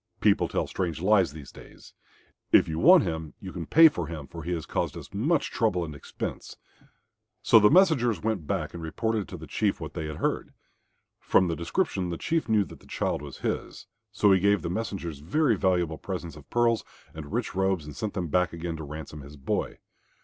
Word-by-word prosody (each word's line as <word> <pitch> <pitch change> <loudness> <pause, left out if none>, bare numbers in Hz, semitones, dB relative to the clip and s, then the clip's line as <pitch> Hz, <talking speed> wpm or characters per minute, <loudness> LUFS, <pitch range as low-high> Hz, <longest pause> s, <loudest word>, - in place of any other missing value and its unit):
People - - +3
tell - - -1
strange 85 -5 -3
lies 95 -3 +3
these 75 -3 -11
days. - - -15 0.6
If - - +6
you 80 0 -3
want 180 -1 +7
him 80 -2 -4
you 95 -2 -8
can 85 -3 -6
pay 165 +1 +8
for 90 - -2
him, 80 -3 -6
for 85 +4 -9
he 85 +3 -4
has 80 -2 -3
caused - - -2
us - - -10
much 140 +9 +1
trouble 95 -7 +1
and 75 - -7
expense." 70 - -7 0.9
So 115 - +7
the 105 0 +6
messengers 150 - +4
went 105 -9 -1
back - - -2
and 85 - -7
reported 110 +5 -2
to - - -8
the - - -9
Chief - - -1
what - - -7
they 80 - -4
had 75 - -5
heard. - - -2 0.6
From 95 - +3
the 85 - -1
description, 95 - -1
the 85 - -3
Chief 165 - -1
knew 110 -2 +4
that - - -13
the - - -19
child - - -2
was 70 -2 -9
his, - - -3 0.3
so 105 - +3
he 95 - +5
gave 100 0 +2
the 85 - -2
messengers 90 -7 -4
very 125 - +2
valuable 90 -4 0
presents 90 -4 -5
of 75 -2 -14
pearls 120 -1 +2 0.3
and 75 -2 -8
rich 120 +2 -2
robes 95 -4 0
and 75 -2 -9
sent 105 +6 -4
them 90 -3 -2
back 90 +2 +1
again 85 0 -4
to 80 - -7
ransom 75 0 -8
his 70 +1 -12
boy. 65 - -2
90 Hz, 210 wpm, -27 LUFS, 80-110 Hz, 0.9 s, pay